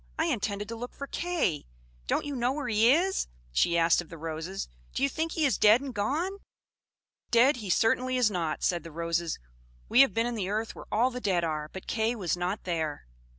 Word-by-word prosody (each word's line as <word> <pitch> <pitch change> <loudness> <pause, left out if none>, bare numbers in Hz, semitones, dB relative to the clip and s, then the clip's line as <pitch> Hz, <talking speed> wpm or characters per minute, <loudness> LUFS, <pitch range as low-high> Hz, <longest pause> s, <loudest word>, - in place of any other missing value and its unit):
"I 320 - +1
intended 205 -8 -1
to 230 - -4
look 245 +2 -7
for 280 - -5
Kay! 330 - -1 0.4
Don't - - 0
you 290 -1 -4
know 245 0 +1
where 290 -2 -4
he 225 +1 +4
is?" 365 +6 +2 0.2
she 170 - +2
asked 165 +1 +4
of 175 - -13
the 165 - -9
roses. 165 +4 -5 0.3
"Do - - 0
you 275 - +4
think 320 +3 -2
he 315 - +1
is 270 - +1
dead 215 +3 +7
and 270 -1 -6
gone?" 310 - -1 0.9
"Dead 250 +4 +5
he 210 -5 -6
certainly 255 +6 +2
is 240 -4 +3
not," 165 -5 -2
said 175 -1 +1
the 165 - -10
Roses. 170 +1 -1 0.5
"We 245 - +7
have 275 - +4
been 230 +1 +2
in 240 - -2
the 195 -5 -2
earth 220 +2 -2
where - - -11
all 245 +4 +3
the 250 0 -6
dead 185 -5 +1
are, 155 -2 -2
but 190 - -8
Kay 225 +1 0
was 180 -8 -1
not 180 +4 -3
there." 160 - -2
220 Hz, 220 wpm, -28 LUFS, 175-255 Hz, 0.9 s, dead